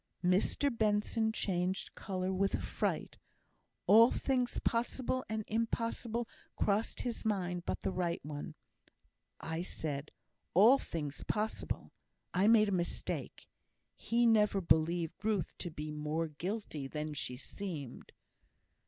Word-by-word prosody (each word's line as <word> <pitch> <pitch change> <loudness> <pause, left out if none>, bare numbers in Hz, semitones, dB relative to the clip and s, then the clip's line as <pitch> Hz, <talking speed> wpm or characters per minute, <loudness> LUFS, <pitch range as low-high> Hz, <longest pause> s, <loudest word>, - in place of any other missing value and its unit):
Mr 205 +9 +2
Benson 220 +1 +2
changed 185 -3 -1
colour 185 -1 -2
with 195 +1 +1
affright. - - -2 0.7
All 225 +3 +8
things 250 -2 0
possible 245 +2 0
and 220 0 -1
impossible 230 +1 -1 0.3
crossed 210 +2 0
his 240 -2 -3
mind 180 -5 -1
but - - -2
the - - 0
right 175 -2 -1
one. 150 +1 -6 0.8
I 160 +1 -3
said, 150 -5 -4 0.5
"all 230 +9 +8
things 150 - -4
possible;" 215 +1 -2 0.4
I 190 +3 +3
made 215 -2 +6
a - - -1
mistake. 175 -2 -3 0.5
He 235 +1 +1
never 210 -3 +4
believed 165 +1 +2
Ruth 210 -4 0
to 175 - -4
be 155 -1 -5
more 150 +2 -1
guilty 160 -2 -4
than 150 +2 -4
she 130 -3 -3
seemed. 155 -4 -7
190 Hz, 120 wpm, -34 LUFS, 160-220 Hz, 0.8 s, All